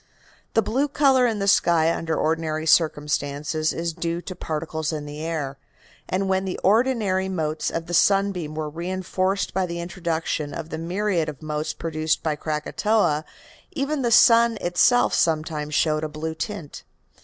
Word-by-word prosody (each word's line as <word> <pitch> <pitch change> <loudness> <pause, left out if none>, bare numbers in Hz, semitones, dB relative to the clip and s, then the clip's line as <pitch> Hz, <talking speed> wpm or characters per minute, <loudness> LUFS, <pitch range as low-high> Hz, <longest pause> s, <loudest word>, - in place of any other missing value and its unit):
The 225 - +4
blue 260 +8 0
color 270 -3 +3
in 225 -2 -1
the 200 -1 -2
sky 165 -4 +4
under 165 -1 -2
ordinary 160 0 -1
circumstances 150 -1 +1
is 165 0 -3
due 170 0 -2
to 185 - -7
particles 160 -1 -3
in 150 -2 -4
the 145 +1 -7
air, 145 -5 -3 0.5
and 195 +1 0
when 190 0 +1
the 190 -1 -3
ordinary 205 -3 +2
motes 155 -4 -2
of 165 0 -4
the 175 - -7
sunbeam 195 -4 +2
were 155 -1 -3
reinforced 185 +4 -2
by 190 -1 0
the 170 0 -5
introduction 165 -4 -3
of 165 -1 -6
the 160 - -5
myriads 175 -1 -1
of 150 0 -9
motes 150 0 -3
produced 155 -1 -1
by 155 -2 0
Krakatoa 155 +2 0 0.5
even 285 0 -1
the 240 - +1
sun 230 0 +6
itself 180 +8 +3
sometimes 155 -2 0
showed 155 0 +2
a 155 - -2
blue 155 +1 -4
tint. 165 -2 -6
165 Hz, 160 wpm, -24 LUFS, 155-195 Hz, 0.5 s, sun